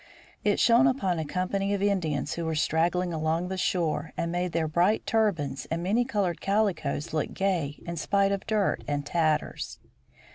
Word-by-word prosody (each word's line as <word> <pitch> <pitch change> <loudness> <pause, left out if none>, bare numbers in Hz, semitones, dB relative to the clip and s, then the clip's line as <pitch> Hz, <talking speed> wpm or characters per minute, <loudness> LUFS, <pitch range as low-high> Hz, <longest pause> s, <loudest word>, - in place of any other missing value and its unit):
It 205 -1 +2
shone 240 +3 +5
upon 195 -10 0
a 160 - -2
company 195 +5 -1
of 200 - -2
Indians 160 -8 0
who 170 - -3
were 160 -1 -1
straggling 170 +3 +1
along 160 +3 -1
the 190 - -2
shore, 165 -4 -1
and 170 - -1
made 175 0 -1
their 165 -1 0
bright 175 +7 +2
turbans 170 - 0
and 165 +1 -2
many 220 +7 +2
colored 200 -8 -1
calicoes 185 -8 0
look 155 - -2
gay 175 -7 -1
in 170 0 -5
spite 200 +4 +2
of 200 -1 -3
dirt 215 -3 +1
and 145 -1 -2
tatters. 155 -1 -1
175 Hz, 175 wpm, -27 LUFS, 160-200 Hz, -, shone